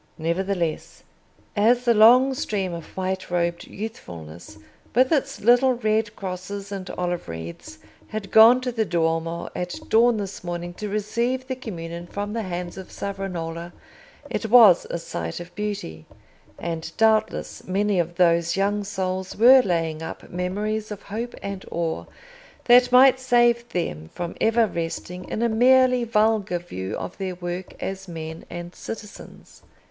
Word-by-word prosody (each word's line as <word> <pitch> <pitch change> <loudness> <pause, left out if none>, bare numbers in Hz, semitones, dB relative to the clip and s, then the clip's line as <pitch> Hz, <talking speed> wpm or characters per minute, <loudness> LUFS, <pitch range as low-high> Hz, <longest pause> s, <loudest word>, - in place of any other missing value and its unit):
Nevertheless, 170 0 -2 0.5
as 235 +4 +3
the 235 - +5
long 245 +5 +6
stream 200 -9 -2
of 170 +1 -9
white 190 0 -2
robed 170 -1 -1
youthfulness, 85 - -9 0.4
with 255 +1 +4
its 275 -3 0
little 245 +3 +5
red 220 -2 0
crosses 195 +1 -6
and 195 -2 -5
olive 175 - -3
wreaths, 80 0 -8 0.3
had 215 -2 -6
gone 230 +3 +8
to 255 -1 -2
the 225 -2 0
Duomo 165 -2 -1
at 180 0 -3
dawn 230 +1 +4
this 200 -3 -5
morning 175 0 -5
to 210 +3 -6
receive 235 +5 -1
the 260 0 -3
communion 170 -8 -7
from 205 +3 -4
the 230 - -2
hands 180 -2 -5
of 190 - -10
Savonarola, 175 -4 -5 0.5
it 225 - -3
was 220 -7 +7
a - - -2
sight 85 - -5
of 175 0 -10
beauty; 200 - -5 0.5
and, 165 -1 -4
doubtless, 220 -1 +1
many 200 +1 +1
of 170 0 -1
those 170 -1 +3
young 205 +1 +1
souls 190 -2 -3
were 255 +4 +8
laying 165 -6 -1
up 160 - -8
memories 210 +5 -2
of 210 -2 -7
hope 230 +4 -5
and 200 -1 -5
awe 165 -1 -2 0.6
that 245 +1 +6
might 260 +1 +7
save 240 -2 +3
them 80 - -3
from 175 -1 -5
ever 225 +1 +4
resting 180 0 -5
in 225 - -2
a - - +4
merely 250 +2 +4
vulgar 215 -4 +2
view 95 - -6
of - - -7
their 190 -2 -3
work 175 +1 -6
as 195 0 -5
men 160 -1 -7
and 175 0 -7
citizens. 220 -2 -10
195 Hz, 150 wpm, -24 LUFS, 175-225 Hz, 0.6 s, gone